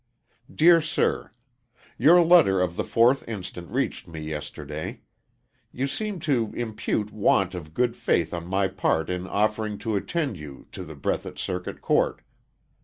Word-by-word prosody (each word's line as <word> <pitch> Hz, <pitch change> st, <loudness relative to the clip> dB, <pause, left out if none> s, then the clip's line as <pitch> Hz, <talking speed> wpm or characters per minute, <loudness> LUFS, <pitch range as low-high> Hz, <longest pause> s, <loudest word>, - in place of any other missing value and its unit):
Dear 165 Hz, +2 st, +6 dB
Sir: 155 Hz, 0 st, 0 dB, 0.7 s
Your 170 Hz, +7 st, +6 dB
letter 160 Hz, -, +6 dB
of 90 Hz, -1 st, 0 dB
the -, -, -1 dB
4th 120 Hz, +4 st, +3 dB
inst. 100 Hz, -6 st, -6 dB
reached 85 Hz, -1 st, -3 dB
me 80 Hz, -2 st, -8 dB
yesterday. 75 Hz, 0 st, -6 dB, 0.7 s
You 130 Hz, -, -2 dB
seemed 195 Hz, +5 st, -3 dB
to 120 Hz, -8 st, +1 dB
impute 110 Hz, -2 st, -2 dB
want 100 Hz, -3 st, +2 dB
of 80 Hz, -3 st, -8 dB
good 120 Hz, -1 st, +1 dB
faith 85 Hz, -7 st, 0 dB
on 85 Hz, 0 st, -5 dB
my 95 Hz, +1 st, +1 dB
part 80 Hz, -2 st, 0 dB
in 90 Hz, 0 st, -3 dB
offering 105 Hz, +1 st, 0 dB
to 110 Hz, -2 st, 0 dB
attend 135 Hz, -, -2 dB
you 70 Hz, -3 st, -10 dB
to 95 Hz, -, -7 dB
the 80 Hz, -3 st, -9 dB
Breathitt 70 Hz, -, -3 dB
Circuit 90 Hz, -1 st, -4 dB
Court. -, -, +1 dB
100 Hz, 150 wpm, -25 LUFS, 85-125 Hz, 0.7 s, Dear